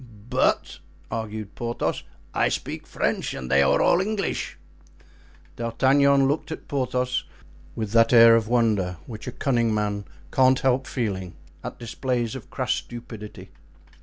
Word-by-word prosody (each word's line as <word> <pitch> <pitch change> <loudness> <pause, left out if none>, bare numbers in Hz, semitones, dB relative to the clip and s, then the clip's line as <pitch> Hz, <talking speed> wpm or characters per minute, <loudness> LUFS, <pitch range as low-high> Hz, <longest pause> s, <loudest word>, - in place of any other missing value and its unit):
"But," - - +1 0.3
argued 110 -2 -4
Porthos, 120 0 -2 0.3
"I - - +2
speak - - -4
French - - -1
and 65 -1 -6
they 70 +1 +5
are 70 - +4
all 175 - +4
English." 205 0 -2 1.0
D'Artagnan 135 +4 +3
looked 145 +3 -1
at 160 - -7
Porthos 125 -2 -1 0.5
with 110 -3 -3
that 115 0 +5
air 115 -1 +8
of 115 -1 +1
wonder 110 -7 +1
which 110 -2 -9
a - - -2
cunning 120 -4 +1
man 105 -1 -1 0.3
cannot 130 0 +4
help 130 0 +1
feeling 95 -7 -3 0.3
at - - -6
displays 120 0 -2
of 130 -5 -8
crass 125 -1 -1
stupidity. 115 -3 -8
115 Hz, 135 wpm, -25 LUFS, 110-130 Hz, 1.0 s, air